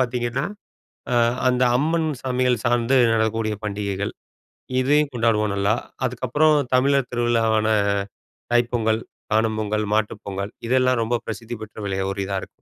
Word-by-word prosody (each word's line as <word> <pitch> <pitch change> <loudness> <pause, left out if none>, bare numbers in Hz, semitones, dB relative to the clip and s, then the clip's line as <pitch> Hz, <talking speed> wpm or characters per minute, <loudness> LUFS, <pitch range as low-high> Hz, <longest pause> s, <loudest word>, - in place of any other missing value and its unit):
பார்த்தீங்கன்னா, 125 +1 -1 0.7
அ - - +3 0.3
அந்த 125 0 +2
அம்மன் 160 +3 +1
சாமிகள் 125 -3 +1
சார்ந்து 120 +2 +2 0.2
நடக்கக்கூடிய 110 -1 0
பண்டிகைகள். 100 -1 -3 0.7
இதையும் 145 +2 +2
கொண்டாடுவோம் 110 -3 +1
நல்லா. 100 +2 +2 0.3
அதுக்கப்பறம் 130 +5 +2 0.2
தமிழர் 135 0 +2
திருவிழாவான 115 -2 +1 0.9
தைப்பொங்கல், 120 -2 +2 0.3
காணும் 110 0 +2
பொங்கல், 105 0 -1
மாட்டுப் 110 -1 -1
பொங்கல் 100 +1 -4 0.2
இதெல்லாம் 130 -1 +3
ரொம்ப 120 +2 0
பிரசித்தி 115 +2 -5
பெற்ற 105 -1 -10
விளைய 95 -1 -1
ஒரு 100 - -5
இதா 100 - -3
இருக்கும். - - -8
115 Hz, 130 wpm, -23 LUFS, 110-125 Hz, 0.9 s, அ